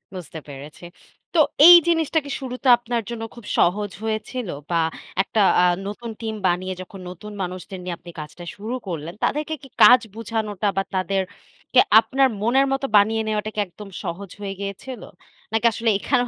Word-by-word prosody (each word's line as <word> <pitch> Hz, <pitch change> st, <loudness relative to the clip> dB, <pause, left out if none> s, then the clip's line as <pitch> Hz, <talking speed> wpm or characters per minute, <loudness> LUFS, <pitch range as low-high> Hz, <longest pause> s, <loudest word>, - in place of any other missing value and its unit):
বুঝতে 165 Hz, -3 st, -7 dB
পেরেছি। 145 Hz, +3 st, -11 dB, 0.5 s
তো 335 Hz, -, +3 dB, 0.3 s
এই 350 Hz, -, +12 dB
জিনিসটা 325 Hz, -1 st, +2 dB
কি -, -, -7 dB
শুরুতে 255 Hz, +1 st, -5 dB
আপনার 240 Hz, -1 st, -2 dB
জন্য 230 Hz, -1 st, -5 dB
খুব 235 Hz, -3 st, -12 dB
সহজ 205 Hz, +3 st, +2 dB
হয়েছিল 220 Hz, +2 st, -3 dB, 0.2 s
বা 170 Hz, -, +1 dB, 0.5 s
একটা 215 Hz, -, -2 dB, 0.2 s
আ -, -, +4 dB, 0.2 s
নতুন 230 Hz, +3 st, -6 dB
টিম 220 Hz, -1 st, -3 dB
বানিয়ে 185 Hz, +1 st, -1 dB
যখন 190 Hz, +1 st, -11 dB
নতুন 200 Hz, +4 st, -9 dB
মানুষদের 185 Hz, +1 st, -6 dB
নিয়ে 180 Hz, -1 st, -4 dB
আপনি 175 Hz, -, -12 dB
কাজটা 155 Hz, +3 st, -9 dB
শুরু 220 Hz, +5 st, -5 dB
করলেন, 165 Hz, -1 st, -5 dB
তাদেরকে 305 Hz, +2 st, 0 dB
কি -, -, -10 dB, 0.2 s
কাজ 250 Hz, 0 st, +9 dB, 0.2 s
বোঝানোটা 220 Hz, -2 st, -3 dB
বা -, -, +4 dB
তাদেরকে 190 Hz, +6 st, -1 dB, 0.2 s
আপনার 270 Hz, +3 st, +2 dB
মনের 260 Hz, +5 st, +3 dB
মতো 270 Hz, 0 st, 0 dB
বানিয়ে 220 Hz, +2 st, +3 dB
নেওয়াটা 215 Hz, 0 st, -1 dB
কি 215 Hz, -, -2 dB
একদম 200 Hz, +3 st, -12 dB
সহজ 185 Hz, +1 st, -5 dB
হয়ে 195 Hz, -1 st, -4 dB
গিয়েছিল? 200 Hz, +5 st, -6 dB, 0.5 s
নাকি 225 Hz, +1 st, 0 dB
আসলে 225 Hz, +1 st, -1 dB
এখানেও 245 Hz, +2 st, +1 dB
210 Hz, 165 wpm, -22 LUFS, 185-240 Hz, 0.5 s, এই